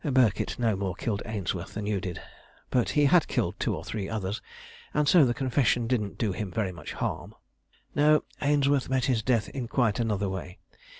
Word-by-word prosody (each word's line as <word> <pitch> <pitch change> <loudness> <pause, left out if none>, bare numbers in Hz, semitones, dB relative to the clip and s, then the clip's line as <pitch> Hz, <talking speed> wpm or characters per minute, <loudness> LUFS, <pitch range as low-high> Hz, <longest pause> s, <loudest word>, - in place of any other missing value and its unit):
Birkett 130 - +2
no 115 -4 +1
more 95 -2 -2
killed 105 +1 -2
Ainsworth 105 -6 -3
than 105 -1 -3
you 105 -2 -1
did; 90 -4 -5 0.5
but 125 -2 +2
he 145 - +5
had 165 +4 +5
killed - - -1
two - - 0
or - - -6
three 100 -3 -4
others, 105 -1 -3 0.5
and 150 -1 +2
so 160 -1 +7
the 120 - +1
confession 130 -3 +1
didn't 115 -4 -1
do 110 -4 0
him 95 +2 -4
very 100 -1 -1
much 85 - -8
harm. - - -4 0.6
"No; 150 +1 +4 0.2
Ainsworth 145 -2 +2
met 130 -1 +1
his 125 -5 +1
death 115 -2 +1
in 130 -4 -4
quite 115 -4 +1
another 105 -4 0
way. 95 -1 -5
115 Hz, 190 wpm, -28 LUFS, 100-130 Hz, 0.6 s, so